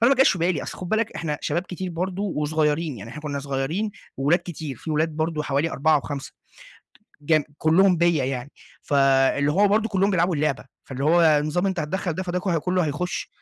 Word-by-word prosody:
فأنا 235 Hz, +3 st, +5 dB
ما -, -, +2 dB
جاش 265 Hz, -7 st, +5 dB
بالي، 170 Hz, -3 st, 0 dB
أصل -, -, -7 dB
خُد 180 Hz, -, -6 dB
بالك، 220 Hz, +2 st, 0 dB
إحنا 150 Hz, -3 st, -3 dB
شباب 175 Hz, -, -1 dB
كتير 185 Hz, 0 st, -6 dB
برضه 185 Hz, +3 st, -3 dB
وصغيرين، 155 Hz, -4 st, 0 dB
يعني 110 Hz, +3 st, -9 dB
إحنا 150 Hz, -, -9 dB
كنا 145 Hz, -2 st, -3 dB
صغيرين 140 Hz, +9 st, -2 dB, 0.3 s
وولاد 145 Hz, +6 st, +3 dB
كتير 155 Hz, -6 st, -6 dB
في 160 Hz, -, -7 dB
ولاد 155 Hz, +2 st, +1 dB
برضه 155 Hz, -1 st, -1 dB
حوالي 145 Hz, +3 st, 0 dB
4 155 Hz, +2 st, +2 dB
أو 150 Hz, -, +3 dB
5 140 Hz, -1 st, -6 dB, 0.9 s
جم 155 Hz, +1 st, +2 dB
كلهم 180 Hz, +3 st, +4 dB
بيّا 170 Hz, -5 st, +2 dB
يعني. 130 Hz, +1 st, -4 dB, 0.3 s
فاللي 135 Hz, +1 st, +3 dB
هو 200 Hz, +6 st, +4 dB
برضه 215 Hz, +2 st, +1 dB
كلهم 195 Hz, 0 st, +2 dB
بيلعبوا 175 Hz, -1 st, +2 dB
اللعبة، 150 Hz, -2 st, -1 dB, 0.2 s
فاللي 135 Hz, 0 st, -5 dB
هو 170 Hz, +3 st, +4 dB
النظام 155 Hz, +2 st, +3 dB
أنتَ 190 Hz, -3 st, -1 dB
هتتدخل 175 Hz, +3 st, -2 dB
ده، 185 Hz, +4 st, -3 dB
فده 180 Hz, 0 st, -2 dB
ك 180 Hz, -2 st, 0 dB
كله 180 Hz, +1 st, 0 dB
هيخش. 155 Hz, +5 st, -3 dB
160 Hz, 200 wpm, -24 LUFS, 145-180 Hz, 0.9 s, فأنا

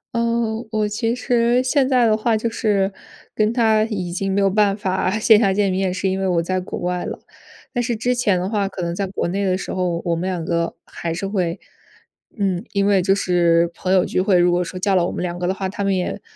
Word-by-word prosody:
哦， 230 Hz, -1 st, 0 dB
我 215 Hz, -1 st, 0 dB
其 225 Hz, +3 st, -1 dB
实 245 Hz, 0 st, +2 dB
现 265 Hz, +1 st, +2 dB
在 250 Hz, -2 st, +4 dB
的 215 Hz, -1 st, +4 dB
话 220 Hz, 0 st, +1 dB
就 225 Hz, -, -2 dB
是 205 Hz, -3 st, 0 dB, 0.4 s
跟 215 Hz, +1 st, +1 dB
他 220 Hz, -3 st, +3 dB
已 190 Hz, -6 st, -4 dB
经 195 Hz, +2 st, -2 dB
没 200 Hz, -, +1 dB
有 195 Hz, -, +4 dB
办 200 Hz, 0 st, +2 dB
法 190 Hz, 0 st, -1 dB
线 220 Hz, 0 st, +5 dB
下 200 Hz, -4 st, +3 dB
见 200 Hz, 0 st, +1 dB
面， 190 Hz, 0 st, 0 dB
是 190 Hz, +1 st, -2 dB
因 190 Hz, 0 st, -1 dB
为 195 Hz, -, 0 dB
我 175 Hz, -2 st, +2 dB
在 185 Hz, +2 st, -1 dB
国 180 Hz, -, -6 dB
外 180 Hz, 0 st, -2 dB
了。 -, -, -5 dB, 0.6 s
但 245 Hz, -, 0 dB
是 240 Hz, -1 st, -1 dB
之 245 Hz, +3 st, 0 dB
前 210 Hz, -7 st, +1 dB
的 180 Hz, -, -2 dB
话 200 Hz, -2 st, -1 dB
可 185 Hz, -2 st, -6 dB
能 170 Hz, 0 st, -2 dB
在 195 Hz, +2 st, -2 dB
国 190 Hz, -2 st, -3 dB
内 195 Hz, +3 st, -1 dB
的 185 Hz, -1 st, +1 dB
时 -, -, -5 dB
候， 175 Hz, -2 st, -1 dB
我 170 Hz, -1 st, +1 dB
们 180 Hz, +3 st, -2 dB
两 175 Hz, -3 st, -3 dB
个 170 Hz, 0 st, -1 dB
还 170 Hz, -, -5 dB
是 195 Hz, -, -4 dB
会 185 Hz, -3 st, -2 dB, 0.8 s
嗯， 190 Hz, -3 st, -1 dB
因 200 Hz, 0 st, +1 dB
为 200 Hz, -2 st, +3 dB
就 195 Hz, +2 st, +2 dB
是 170 Hz, -3 st, +2 dB
朋 185 Hz, -, -3 dB
友 190 Hz, -1 st, +4 dB
聚 -, -, 0 dB
会， 190 Hz, -1 st, +3 dB
如 175 Hz, 0 st, +4 dB
果 180 Hz, +1 st, +1 dB
说 180 Hz, -, -7 dB
叫 195 Hz, +1 st, +1 dB
了 180 Hz, -, +3 dB
我 -, -, -3 dB
们 -, -, -4 dB
两 175 Hz, 0 st, -4 dB
个 175 Hz, -, -1 dB
的 185 Hz, -, +1 dB
话， 190 Hz, 0 st, -3 dB
他 200 Hz, +1 st, -4 dB
们 195 Hz, -1 st, +1 dB
也 180 Hz, -, -3 dB
195 Hz, 270 characters per minute, -21 LUFS, 180-215 Hz, 0.8 s, 线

